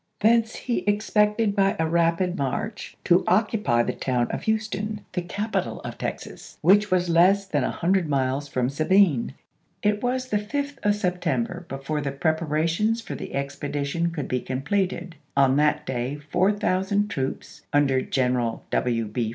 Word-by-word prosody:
Thence 225 +1 +3
he 245 - -2
expected 210 0 +2
by 195 -1 +3
a 160 - +1
rapid 170 +2 +1
march 140 - -4
to 175 0 +4
occupy 205 - +2
the - - -2
town 125 -2 -1
of - - -3
Houston, 215 -1 -1
the 180 - -1
capital 205 +5 -3
of - - -7
Texas, - - -6
which 205 +2 +5
was 180 -1 +2
less 185 +4 +4
than 190 - 0
a - - 0
hundred 180 -1 0
miles 135 0 0
from 125 -3 0
Sabine. 155 - +2 0.5
It 210 0 +1
was 255 +1 -1
the 210 - +2
5th 280 +6 -4
1863. 205 - +1
of 205 - +3
September 180 - -2
before 135 +3 -3
the 140 -1 -2
preparations 160 +8 0
for 225 - -7
the - - -6
ex 140 0 -3
pedition 145 +4 -2
could 150 -5 -4
be 125 -1 -1
completed; 170 +5 -2 0.2
on 135 -1 +4
that 150 0 +2
day 125 +2 -2
4000 190 +5 +1
troops, 135 -8 -4
under 140 -3 +3
General 125 -4 -1
W. 115 -3 0
175 Hz, 160 wpm, -25 LUFS, 140-205 Hz, 0.5 s, which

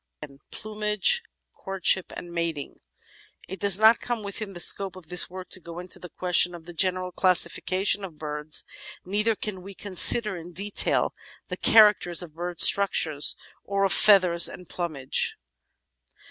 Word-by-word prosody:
§ - - -6
12 140 -1 -21
PLUMAGE, 210 - -1 0.4
COURTSHIP, 190 -1 -2
AND 175 -1 -10
MATING 165 -4 -5 0.7
It 190 0 -9
does 200 -1 +4
not 220 +2 +4
come 240 -3 -5
within 200 0 -7
the 175 - -9
scope 190 +1 +2
of 180 -4 -15
this 180 -1 +2
work 185 0 -11
to - - -5
go 170 -1 -12
into 180 0 -7
the 180 - -11
question 180 0 0
of 165 -2 -14
the 175 - -11
general 185 +1 0
classification 185 +2 +1
of 170 -5 -10
birds, 150 0 -1 0.4
neither 210 +4 -2
can 200 -3 -7
we 195 +1 -13
con 200 0 -11
sider 210 +2 +6
in 175 +1 -12
detail 200 +4 -1 0.4
the - - -6
characters 205 -6 +3
of 165 -3 -13
bird 175 +1 -7
structiure 165 -7 +3 0.4
or 200 0 -3
of 195 - +1
feathers 185 -5 +4
and 180 - -13
plumage. 155 -7 -2
185 Hz, 160 wpm, -24 LUFS, 170-200 Hz, 0.7 s, sider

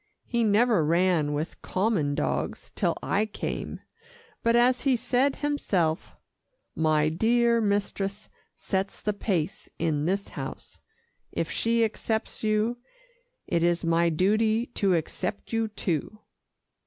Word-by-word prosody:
He 235 -1 0
never 215 -3 +4
ran 165 -1 +2
with 150 +3 -4
common 185 -8 0
dogs - - -2
till - - 0
I 210 +2 +1
came, 210 - -5 0.6
but 230 0 +3
as 250 +1 +4
he 270 -2 +3
said 255 +3 +1
himself, 190 - -1 0.6
'My 155 -1 +2
dear 235 +6 +3
mistress 200 0 -1 0.3
sets 195 0 -2
the 210 - -1
pace 190 -4 -2
in 155 -3 0
this 195 +2 -1
house - - -8 0.5
if - - -2
she 230 0 +2
accepts 220 0 -3
you, 215 +3 +1 0.7
it 170 - 0
is 170 0 +2
my 170 +1 +3
duty 215 +7 +2
to 195 -3 +2
accept 180 +6 -3
you, 225 0 +1
too. 205 -2 -3
200 Hz, 125 wpm, -27 LUFS, 170-225 Hz, 0.7 s, never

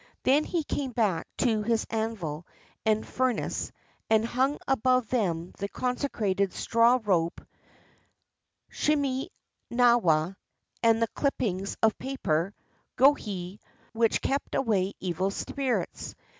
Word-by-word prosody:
Then 290 +4 +4
he 340 -3 -1
came 275 -3 -3
back 200 -9 +1
to 225 -4 +2
his 225 +1 0
anvil 205 -9 -3 0.4
and 220 0 +2
fur 255 -1 +1
nace, - - -3 0.4
and 220 0 +4
himg 265 +5 +1
above 255 -2 +2
them 180 -8 -1
the 200 0 -3
consecrated 215 -7 -1
straw 235 +2 +3
rope 170 -5 +1 1.3
(shime 280 -3 0 0.4
nawa) 195 -9 +3 0.4
and 230 -1 +4
the - - +2
clippings 200 -9 -1
of 220 -1 +3
paper 195 -9 -1 0.4
(gohei) 205 -9 +2 0.3
which 230 -1 +2
kept 275 +1 -1
away 200 -6 +1
evil 185 +1 -1
spirits. 260 +5 -3
225 Hz, 115 wpm, -28 LUFS, 195-255 Hz, 1.3 s, Then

